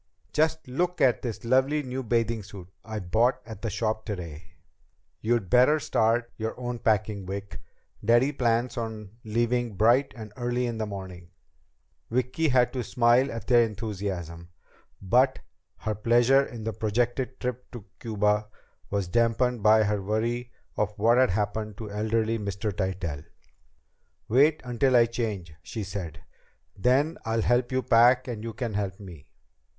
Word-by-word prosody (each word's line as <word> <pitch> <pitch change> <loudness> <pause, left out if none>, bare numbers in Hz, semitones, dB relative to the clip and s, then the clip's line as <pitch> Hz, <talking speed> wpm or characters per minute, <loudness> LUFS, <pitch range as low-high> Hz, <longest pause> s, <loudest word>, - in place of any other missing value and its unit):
"Just 160 -1 +1
look 175 +8 -1
at 130 -3 +3
this 115 -3 -5
lovely 135 +5 +2
new 130 0 -4
bathing 115 -1 0
suit 95 -2 -11 0.2
I 110 0 -6
bought 115 +7 +1
at 110 -3 -9
the 115 - -2
shop 110 +1 -2
today!" 85 -7 -7 0.7
"You'd 115 -3 +1
better 130 - +5
start 115 -2 +1
your 110 +2 -4
own 120 -1 -4
packing, 105 -3 0
Vic. 100 +1 -6 0.4
Daddy 120 +6 +4
plans 120 -2 0
on 110 -3 -5
leaving 120 0 0
bright 120 +7 +3
and 110 -2 -9
early 120 0 -1
in 115 -2 -3
the 110 - -2
morning." 95 -3 -8 0.8
Vicki 125 +7 0
had 125 -1 +3
to 125 -2 -2
smile 120 +3 +3
at 115 -3 -6
their 120 -1 +5
enthusiasm, 95 -6 -5 0.5
but 125 +7 +3 0.4
her 110 - -2
pleasure 120 +6 +4
in 115 -3 -8
the 110 0 -3
projected 120 +4 -1
trip 125 0 -4
to 120 -5 -10
Cuba 105 -1 0 0.4
was 100 -3 -1
dampened 120 +3 +1
by 110 +1 +5
her 105 -1 0
worry 115 +4 -2 0.3
of 105 0 -1
what 115 +4 +4
had 130 - +4
happened 105 +1 -2
to 110 -3 -7
elderly 110 +2 0
Mr. 100 0 -3
Tytell. 90 -6 -3 1.0
"Wait 145 +7 +4
until 125 +2 +1
I 120 -1 +7
change," 110 -8 -4
she 110 +5 -6
said. 90 -6 -6 0.5
"Then 130 - +2
I'll 115 0 0
help 120 +1 +2
you 130 0 0
pack 120 +2 +5
and 115 -3 -5
you 115 -1 -5
can 115 -1 -4
help 100 -2 -3
me." 85 -7 -11
115 Hz, 155 wpm, -27 LUFS, 105-125 Hz, 1.0 s, I